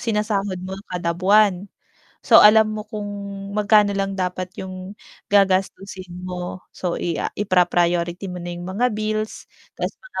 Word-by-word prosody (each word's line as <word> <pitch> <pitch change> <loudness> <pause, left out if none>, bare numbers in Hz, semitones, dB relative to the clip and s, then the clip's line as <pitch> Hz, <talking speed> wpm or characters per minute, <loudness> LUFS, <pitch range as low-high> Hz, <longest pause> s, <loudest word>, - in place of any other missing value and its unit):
sinasahod 210 -4 -1
mo 190 - -5 0.2
kada 175 -1 -1
buwan. 200 0 +3 0.5
So, - - +6
alam 215 +1 +7
mo 215 - -5
kung 210 -2 -5 0.5
magkano 210 -1 +4
lang 195 0 -1
dapat 185 0 -3
yung 185 +1 -7 0.4
gagastusin 195 -1 +1 0.2
mo. 180 0 -5
So, 180 -2 -3
i 170 -2 -1
ah, - - -3
ipra 185 -3 +3
priority 175 +1 0
mo 180 - -6
na 175 - -5
yung 175 0 -7
mga 230 +5 0
bills 215 0 -3 0.3
ta's - - -2
mga - - -7
195 Hz, 155 wpm, -22 LUFS, 180-210 Hz, 0.5 s, alam